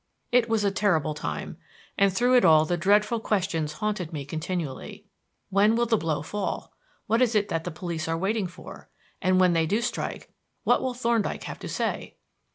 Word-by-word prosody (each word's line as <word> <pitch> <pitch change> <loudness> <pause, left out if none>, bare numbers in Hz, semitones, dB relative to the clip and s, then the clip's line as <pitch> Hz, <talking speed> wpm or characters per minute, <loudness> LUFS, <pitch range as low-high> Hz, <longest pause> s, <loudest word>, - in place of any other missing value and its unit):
It 240 -1 +3
was 225 -2 +1
a 200 - +2
terrible 175 -7 +1
time; 75 - -5 0.4
and 200 0 +3
through 245 +7 +2
it 245 - +5
all 155 -1 +6
the 175 - 0
dreadful 210 +5 +3
questions 180 -8 -1
haunted 205 -2 -3
me 145 -4 -5
continually: 155 -1 -5 0.5
When 205 +3 +4
will 235 +1 +2
the 230 -1 +2
blow 160 -7 -1
fall? 205 +5 -4 0.3
What 225 +3 +2
is 240 -3 +3
it 205 -1 +2
that 165 0 -2
the - - -2
police 165 0 -4
are 165 0 0
waiting 195 +2 0
for? 180 +1 -12 0.3
And 185 -1 +3
when 180 -1 +5
they 165 -1 +2
do 210 +7 +1
strike, 245 +1 -4 0.3
what - - +3
will 255 -1 -2
Thorndyke 235 -3 0
have - - -7
to - - -7
say? - - -3
190 Hz, 190 wpm, -26 LUFS, 165-220 Hz, 0.5 s, all